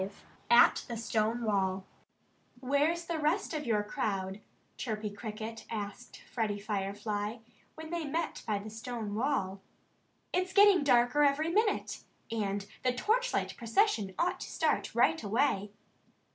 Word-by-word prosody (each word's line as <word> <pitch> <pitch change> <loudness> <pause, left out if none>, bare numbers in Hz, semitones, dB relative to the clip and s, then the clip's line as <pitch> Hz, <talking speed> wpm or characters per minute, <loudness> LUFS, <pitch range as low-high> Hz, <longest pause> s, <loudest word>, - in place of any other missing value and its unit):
V 190 - -2 0.4
AT 235 - +6
THE 235 - -4
STONE 225 +1 0
WALL 190 -3 0 0.7
"Where's 290 +6 +1
the 335 -1 -2
rest 315 +5 0
of 300 -4 -3
your 210 -2 +2
crowd?" 195 -1 -3 0.3
Chirpy 215 -3 -3
Cricket 220 +1 -7
asked 210 +2 -6
Freddie 215 -4 -2
Firefly, 205 +1 -3 0.4
when 315 +1 -8
they 340 -2 -2
met 320 +4 -2
by 210 -2 +1
the 210 +2 -7
stone 225 -2 -5
wall. 210 -6 -1 0.7
"It's 365 +1 0
getting 400 -4 +7
darker 245 +1 +4
every 295 +3 +3
minute. 420 +4 0 0.3
And 200 -3 -1 0.2
the 255 -1 +2
torchlight - - 0
procession 230 - +1
ought 360 +2 0
to - - -6
start - - 0
right 320 - +3
away." 210 -1 +1
230 Hz, 135 wpm, -31 LUFS, 205-305 Hz, 0.7 s, getting